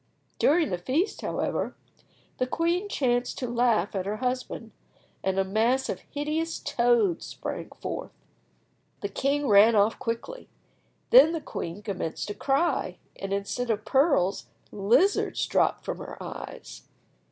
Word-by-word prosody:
During 320 - +3
the 180 - -1
feast, 285 - -1
however, - - -2 0.6
the 255 - +1
queen 340 +8 0
chanced 245 -7 0
to 250 - -3
laugh 235 -5 +1
at 190 -1 -2
her 210 +1 -2
husband, 250 -2 -3 0.5
and 190 0 0
a 195 - +3
mass 225 +7 +1
of - - -2
hideous 310 +3 -2
toads 235 -7 +2
sprang - - -6
forth! - - -4 0.9
The 200 - -2
king 280 +6 0
ran 215 +2 +7
off 210 +2 +3
quickly. 235 - -5 0.6
Then 460 -9 +8
the 330 - -1
queen 190 -7 -6
commenced 185 -6 -3
to - - -2
cry, 275 +10 0 0.2
and 195 - -5
instead 200 +5 -2
of 215 -1 -1
pearls, 265 - +2 0.2
lizards 245 - +2
dropped - - +1
from - - -4
her - - -8
eyes. - - -8
240 Hz, 140 wpm, -27 LUFS, 200-290 Hz, 0.9 s, Then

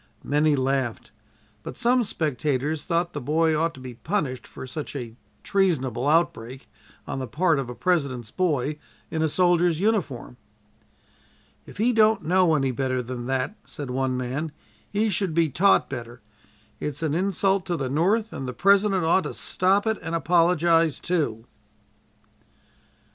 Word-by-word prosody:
Many 150 +1 +2
laughed, 130 -3 -1 0.5
but - - -8
some 245 +1 +3
spectators 150 - -1
thought 170 0 0
the 145 - -4
boy 160 +4 +2
ought 165 +2 0
to - - -12
be 130 -1 -8
punished 130 - -3
for - - -9
such 145 +3 -6
a 120 -4 -6 0.3
treasonable 140 - 0
outbreak 135 -5 0 0.4
on - - -4
the 130 - -4
part 160 - +1
of 130 -3 -4
a 125 - -6
President's 130 -6 -1
boy 150 -3 -1 0.3
in 160 - -1
a 160 - +2
soldier's 175 -1 +2
uniform. 180 - -1 1.3
"If - - -12
he 235 +4 +2
don't 220 -2 +4
know 180 -1 +3
any 135 -3 +1
better 130 0 -1
than 120 0 -6
that," 135 +9 -1
said 145 -5 -7
one 130 0 -1
man, 135 +5 -3 0.4
"he 210 +1 0
should 185 -3 -1
be 165 -2 +3
taught 195 +8 +4
better. 120 -3 -8 0.6
It's 150 +2 -4
an 155 -2 0
insult 195 +2 +1
to 175 -2 -1
the 135 - -2
North 200 - +1
and 135 - -5
the 125 - -4
President 195 0 +3
ought 175 +3 +3
to - - -5
stop 195 +3 +1
it 220 -1 0
and 165 +1 -3
apologize, 165 -2 +3
too." 145 -11 -1
155 Hz, 155 wpm, -25 LUFS, 130-180 Hz, 1.3 s, don't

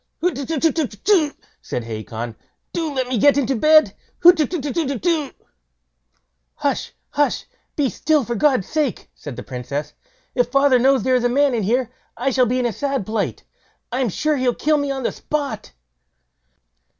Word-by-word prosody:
"Hutetutetutetu!" 315 - +1 0.3
said 125 - -4
Hacon; 115 +1 -6 0.4
"do 325 -3 -2
let 260 -2 -1
me 250 -3 -1
get 285 +5 +5
into 270 -1 +1
bed. 310 +6 +5 0.3
Hutetutetutetu." 315 -2 +2 1.2
"Hush! - - -2 0.2
hush! 290 0 0 0.3
be 290 -3 +1
still 300 +3 +1
for 240 - -2
God's 255 -4 +2
sake", 300 -6 -2
said 145 -4 -9
the 125 - -7
Princess; 140 +4 -5 0.4
"if 245 -1 +2
father 275 -1 +4
knows 265 -2 +3
there 260 - +2
is 245 - -2
a 245 - +3
man 280 +2 +3
in 230 - 0
here, 240 +4 0 0.3
I 270 +3 0
shall 255 -1 +3
be 250 +3 0
in 250 - 0
a 235 - 0
sad 275 -2 -2
plight. 215 0 -2 0.5
I'm 250 -1 0
sure 305 - 0
he'll 255 -2 +1
kill 305 0 +2
me 285 -1 -2
on 270 -1 -3
the - - 0
spot." 285 - -4
265 Hz, 155 wpm, -21 LUFS, 235-295 Hz, 1.2 s, get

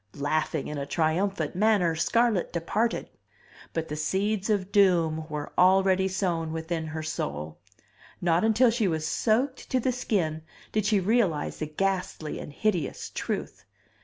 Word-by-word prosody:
Laughing 150 +1 -1
in 150 -1 -4
a 140 - -3
triumphant 165 +2 0
manner, 200 -4 +3
Scarlett 220 +4 +1
departed. 210 +7 -1 0.6
But 165 -1 -3
the 150 - -4
seeds 195 +7 -1
of 200 -2 0
doom 170 -6 +3
were 150 -1 -5
already 190 +1 +4
sown 175 -4 -1
within 160 0 -3
her 155 0 -5
soul. 75 - -4 0.6
Not 175 0 +2
until 225 +2 +4
she 225 -3 +1
was 160 -3 -1
soaked 255 - 0
to 255 - +2
the 255 +1 +1
skin 180 -10 -1 0.3
did 215 -2 0
she 210 -2 +3
realize 190 -6 +1
the 155 - -2
ghastly 180 -1 -2
and - - -8
hideous 180 -1 -1
truth. - - -4
180 Hz, 145 wpm, -27 LUFS, 160-210 Hz, 0.6 s, already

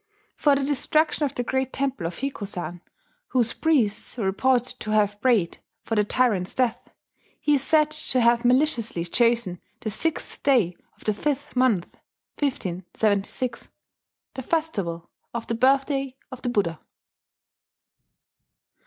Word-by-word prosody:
For 290 -2 +4
the 275 - 0
destruction 305 +2 +1
of 275 - -4
the 245 - -1
great 265 +1 -1
temple 270 -10 -2
of 170 - -6
Hikozan, 200 -9 -4 0.5
whose 240 -2 +2
priests 255 -10 +1
were 220 - -1
reported 250 +5 +1
to 215 - -6
have 205 -1 +1
prayed 230 -9 +2 0.2
for - - -4
the 210 -1 +3
tyrant's 210 -5 +1
death, 250 -3 0 0.5
he 295 - +2
is 280 - +3
said 305 +1 +3
to 305 -4 +2
have 235 0 +4
maliciously 245 - +2
chosen 230 -2 +1 0.2
the 215 - -3
sixth 325 - -2
day 230 -11 +3 0.2
of - - -17
the 215 - +1
fifth 285 +6 -2
month 250 -8 +1 0.4
(1576), 205 - -1 0.6
the 265 - -5
festival 210 - -2 0.3
of 235 - -3
the - - -2
Birthday 270 +2 +2 0.2
of 255 -1 -8
the 245 - -1
Buddha! 185 -9 0
245 Hz, 135 wpm, -25 LUFS, 205-275 Hz, 0.6 s, For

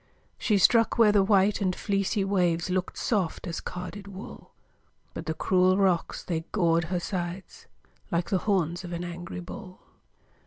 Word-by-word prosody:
She 210 -4 +2
struck 230 +4 +4
where 225 -3 +6
the 205 -1 +4
white 200 +1 +3
and 185 -2 +1
fleecy 200 0 0
waves 180 -3 +1
Look'd 185 0 -2
soft 200 -7 -1
as 170 -2 -4
carded 180 +3 -7
wool, 195 +1 -10 0.6
But - - -7
the 160 - -1
cruel 185 +2 +3
rocks, 190 -4 +1
they 165 -2 -2
gored 170 -4 +2
her 175 +2 -1
sides 180 +1 -5 0.4
Like 170 -2 -1
the 190 - +3
horns 180 -4 0
of 175 -1 -6
an 170 +1 -3
angry 175 0 -6
bull. 185 +1 -9
185 Hz, 160 wpm, -27 LUFS, 175-200 Hz, 0.6 s, where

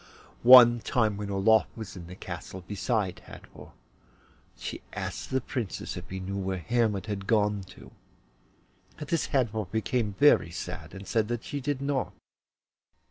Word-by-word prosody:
One 120 -1 +9
time, 110 -2 +1
when 100 0 -5
Olof 100 +3 +3
was 110 -4 -8
in 85 -2 -9
the 90 - -9
castle 95 0 -8
beside 100 -1 -2
Hadvor, - - -13 0.8
she - - -6
asked - - -5
the 130 - +1
Princess 115 -7 -4
if - - -7
she 95 - -5
knew 95 +1 -4
where 95 0 -2
Hermod 105 +2 0
had 100 -2 -5
gone 105 -2 +2
to. - - -14 1.1
At 150 - -8
this 165 - 0
Hadvor 110 -6 0
became 110 -1 -1
very 145 -9 +5
sad, 85 +2 -7
and 95 0 -9
said 110 -3 +1
that 120 0 -3
she 145 - -5
did 140 0 -2
not. 140 -2 -1
110 Hz, 155 wpm, -28 LUFS, 95-120 Hz, 1.1 s, One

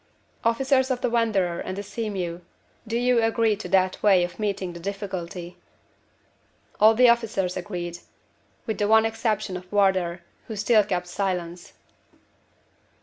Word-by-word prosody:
Officers 260 +3 +2
of 255 -1 -1
the 250 - 0
Wanderer 200 -7 +1
and 185 - -5
the 200 - -4
Sea 220 +2 -4
mew, 175 -3 -4 0.5
do 230 +1 -1
you 245 -1 +3
agree 225 -1 +2
to 215 - -7
that 185 -1 +2
way 195 -4 +5
of 175 +3 -5
meeting 200 -4 -2
the 170 - -9
difficulty?" 185 -2 -6 1.2
All 220 +1 +6
the 250 +2 +6
officers 220 -6 +1
agreed, 175 -2 -5 0.7
with 220 - -3
the 205 - +1
one 220 +1 +5
exception 215 -3 -1
of 180 0 -9
Wardour, 190 -4 +2 0.3
who 220 - -5
still 215 +1 +4
kept 180 -3 -2
silence. 175 -2 -4
200 Hz, 145 wpm, -25 LUFS, 180-225 Hz, 1.2 s, All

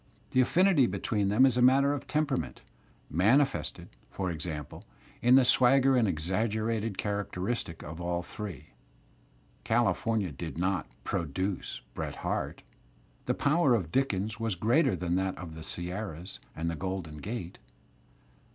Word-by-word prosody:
The 130 - +4
afBnity 170 0 +4
between 100 +1 0
them 110 +6 +5
is 130 -2 +2
a - - +3
matter 135 +3 +5
of 145 - -5
temperament, 135 - -1 0.5
mani 105 - +4
fested, 135 - -5 0.2
for 95 -2 -3
example, 80 -2 -6 0.4
in 125 +2 +6
the 135 -1 +6
swagger 135 +1 +5
and 120 -4 +3
exaggeration 110 +5 -1
character 100 -3 -3
istic 95 -5 -3
of 80 +3 -7
all 85 0 -1
three.. 100 - -7 0.9
California 115 -4 +1
did 80 +4 -6
not 90 -3 0 0.2
"produce" 90 +5 -3
Bret - - -4
Harte; - - -2 0.6
the - - +1
power 145 -3 +3
of 90 -8 -2
Dickens 110 -6 0
was 115 -4 -1
greater 115 - +3
than 85 0 -2
that 95 0 -1
of 85 -3 -8
the 80 - -9
Sierras 90 +1 -5 0.2
and 80 +1 -3
the 85 - -1
Grolden 90 -3 -4
Gate. 95 -4 -6
100 Hz, 140 wpm, -29 LUFS, 85-125 Hz, 0.9 s, in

